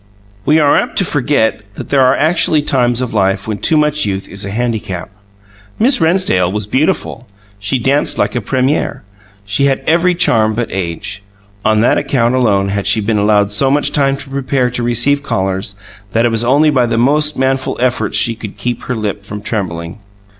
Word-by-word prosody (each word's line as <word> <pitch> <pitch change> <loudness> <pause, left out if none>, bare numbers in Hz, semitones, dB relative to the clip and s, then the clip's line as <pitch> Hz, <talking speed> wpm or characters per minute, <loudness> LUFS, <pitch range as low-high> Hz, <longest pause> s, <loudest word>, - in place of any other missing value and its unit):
We 155 - +4
are 145 -2 +4
apt - - -2
to 195 - +2
forget 140 -8 0
that - - -8
there 140 -1 +3
are 130 +1 +4
actually 160 -1 +2
times 125 -4 +1
of 125 -3 -3
life 95 -1 0
when 105 -2 -3
too 155 +10 +3
much 150 0 +1
youth 95 -1 -3
is 95 +1 -6
a 100 - -4
handicap. 105 -5 -3 0.7
Miss 250 -2 +3
Rennsdale 160 - +2
was 105 0 -3
beautiful; 130 - -1 0.3
she 105 +6 -1
danced 135 +4 +1
like - - 0
a 120 - -1
premiere; 130 +5 -1 0.4
she 100 +7 +1
had 135 -1 0
every 175 +2 +2
charm 110 -9 +2
but 120 +1 -3
age. 95 +2 -4 0.4
On 110 -1 +2
that 120 - +3
account 120 -2 0
alone 100 -6 +1
had 100 0 -2
she 100 +2 +4
been 105 0 0
allowed 105 -1 +2
so 135 +6 +1
much 145 +2 +1
time 135 -2 +1
to 140 - -10
prepare 130 -2 -1
to 120 - -4
receive 120 +4 +1
callers 95 -5 -2 0.4
that 115 +1 +2
it 120 - +1
was 115 0 +1
only 145 +5 +3
by 125 -4 +2
the 115 - -1
most 150 +5 +2
manful 130 0 -1
efforts 120 -4 0
she 115 +2 +3
could 110 -2 -9
keep 120 -1 -3
her 125 - -3
lip 105 -2 -4
from 105 +1 -5
trembling. 85 -4 -4
120 Hz, 195 wpm, -14 LUFS, 105-140 Hz, 0.7 s, We